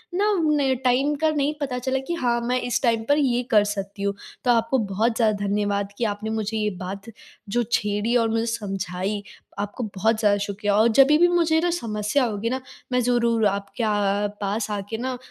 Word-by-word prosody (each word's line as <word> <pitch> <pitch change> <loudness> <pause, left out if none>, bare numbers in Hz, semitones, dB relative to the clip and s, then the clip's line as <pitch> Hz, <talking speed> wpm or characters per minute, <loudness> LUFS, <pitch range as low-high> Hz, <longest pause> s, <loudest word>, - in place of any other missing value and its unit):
ना 315 -9 +2
टाइम 265 +4 +2
का 315 - +4
नहीं 295 0 0
पता 265 -3 -2
चला 260 +1 -1
कि 345 - -1
हाँ, 240 -7 0
मैं 250 +1 0
इस 245 -2 -1
टाइम 230 -2 +2
पर 285 - +5
ये 250 -4 +2
कर 210 -2 +6
सकती 200 0 -4
हूँ। 200 0 0 0.3
तो 245 - +3
आपको 230 +2 +2
बहुत 215 +2 0
ज़्यादा 215 -3 +1
धन्यवाद 200 0 -1
कि - - -2
आपने 210 +1 -3
मुझे 220 0 -2
ये 210 -1 0
बात 195 +4 -6 0.4
जो 240 +3 +1
छेड़ी 210 +3 0
और 230 -1 +2
मुझे 225 +1 0
समझाई, 195 -3 -3 0.4
आपको 205 +4 -4
बहुत 220 +3 +1
ज़्यादा 205 -2 +3
शुक्रिया। 200 0 -1
और 220 +2 +5
जब 265 +4 +6
भी 305 +4 +5
मुझे 335 -2 +2
ना 350 - +2
समस्या 225 -3 0
होगी 225 0 -2
ना 260 +1 -2 0.3
मैं 250 - +2
ज़रूर 235 -2 +2
आपके 200 +3 -3
अ, 220 - +2 0.5
पास 205 +2 -2
आके 205 +2 -4
ना 255 +1 -3
225 Hz, 195 wpm, -24 LUFS, 205-255 Hz, 0.5 s, कर